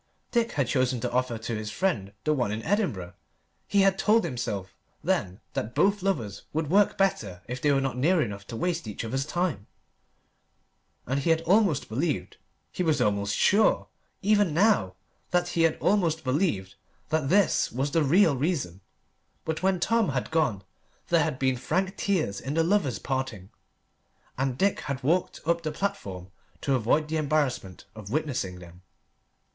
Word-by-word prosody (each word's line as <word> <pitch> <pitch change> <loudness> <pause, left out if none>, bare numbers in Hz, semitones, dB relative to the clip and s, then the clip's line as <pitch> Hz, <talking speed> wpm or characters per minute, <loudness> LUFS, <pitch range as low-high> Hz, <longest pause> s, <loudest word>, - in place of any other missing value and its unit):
Dick 235 -1 +1
had 140 -5 0
chosen 130 -1 +1
to - - -2
offer 125 -1 0
to 115 +1 -4
his 110 0 -4
friend 105 - -1
the 155 - +2
one 125 -8 0
in 110 +1 -4
Edinburgh. 160 - -1 0.5
He 200 - +3
had 195 0 +3
told 220 +1 +4
himself 105 -6 -4 0.3
then 90 +2 -1
that 110 +3 -3
both 200 0 +3
lovers 120 - -2
would 155 0 -1
work 205 +1 +4
better 105 - 0
if 125 +1 -5
they 145 - +3
were 140 - +3
not 135 -2 -2
near 165 +7 +3
enough 100 -7 -3
to - - -6
waste 170 +1 -2
each 105 +2 -5
other's 135 +5 -2
time, 175 - -2 1.4
and 135 +3 0
he 155 - -1
had 165 0 +3
almost 185 -3 +2
believed 140 +6 -2 0.3
he - - -4
was 160 -5 +2
almost 100 -3 +1
sure, 215 +2 +3 0.3
even 205 -5 +3
now, 180 - +3 0.3
that 175 0 +1
he 170 - 0
had 165 -1 +3
almost 170 -6 +1
believed 130 - 0 0.4
that 155 -3 0
this 200 +3 +3
was 135 +4 -1
the 165 - +2
real 165 +2 +4
reason. 130 - -2 0.6
But 160 0 -2
when 190 -1 +2
Tom 225 +1 +2
had 130 +1 -2
gone 120 -12 +1 0.5
there - - +4
had - - -2
been 130 -1 +1
frank 185 +9 -1
tears 160 - -1
in 135 +4 -4
the 165 - +3
lovers' 165 - +1
parting, 130 -8 -4 0.8
and 130 -1 -1
Dick 200 +5 +2
had 140 -2 -4
walked 170 +7 0
up 170 +1 +1
the 155 -2 -3
platform 95 - -4 0.3
to 140 - 0
avoid 130 +5 +2
the 160 +1 -1
embarrassment 145 -11 -1
of 110 -2 -10
witnessing 125 -9 -2
them. 90 0 -13
145 Hz, 170 wpm, -27 LUFS, 115-175 Hz, 1.4 s, told